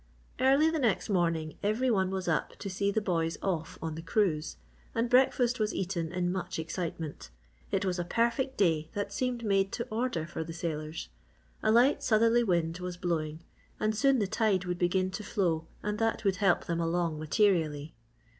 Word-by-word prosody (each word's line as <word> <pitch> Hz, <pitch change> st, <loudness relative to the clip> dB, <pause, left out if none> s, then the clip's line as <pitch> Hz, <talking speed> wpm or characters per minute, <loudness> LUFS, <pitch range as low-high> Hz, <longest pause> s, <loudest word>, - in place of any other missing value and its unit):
Early 275 Hz, +4 st, +5 dB
the 320 Hz, -, -1 dB
next 235 Hz, -3 st, +1 dB
morning 165 Hz, -5 st, 0 dB
every 230 Hz, +5 st, +1 dB
one 190 Hz, -4 st, +2 dB
was 190 Hz, -1 st, -3 dB
up 160 Hz, -2 st, 0 dB
to 195 Hz, -, -5 dB
see 200 Hz, +2 st, 0 dB
the 210 Hz, +1 st, 0 dB
boys 165 Hz, -4 st, 0 dB
off 170 Hz, -4 st, -2 dB
on 160 Hz, -1 st, -2 dB
the 160 Hz, -, -6 dB
cruise, 165 Hz, -3 st, 0 dB, 0.4 s
and 230 Hz, +1 st, 0 dB
breakfast 250 Hz, -1 st, +4 dB
was 215 Hz, 0 st, 0 dB
eaten 175 Hz, -4 st, -2 dB
in 180 Hz, 0 st, 0 dB
much 185 Hz, -1 st, -3 dB
excitement. 160 Hz, -, -5 dB, 0.4 s
It 195 Hz, 0 st, 0 dB
was 180 Hz, -1 st, -1 dB
a -, -, 0 dB
perfect 235 Hz, +7 st, 0 dB
day 160 Hz, -5 st, +2 dB
that 205 Hz, 0 st, -3 dB
seemed 245 Hz, +1 st, -2 dB
made 195 Hz, -1 st, +2 dB
to 235 Hz, -, -3 dB
order 220 Hz, -8 st, -1 dB
for 160 Hz, -, -5 dB
the 165 Hz, +1 st, -7 dB
sailors. 160 Hz, -2 st, -4 dB, 0.5 s
A 215 Hz, -, +3 dB
light 245 Hz, +5 st, +4 dB
southerly 230 Hz, +1 st, +4 dB
wind 170 Hz, -4 st, 0 dB
was 180 Hz, -1 st, -5 dB
blowing 160 Hz, -3 st, -2 dB, 0.4 s
and 215 Hz, 0 st, +1 dB
soon 270 Hz, +5 st, +4 dB
the 210 Hz, -, +1 dB
tide 195 Hz, -2 st, +1 dB
would 180 Hz, -1 st, -3 dB
begin 185 Hz, +1 st, +1 dB
to 210 Hz, -, -5 dB
flow 170 Hz, -6 st, 0 dB, 0.2 s
and 210 Hz, +1 st, -2 dB
that 225 Hz, 0 st, 0 dB
would 190 Hz, -2 st, +2 dB
help 195 Hz, -3 st, +2 dB
them 170 Hz, -1 st, -1 dB
along 165 Hz, -2 st, 0 dB
materially. 155 Hz, -3 st, +1 dB
185 Hz, 185 wpm, -30 LUFS, 165-220 Hz, 0.5 s, Early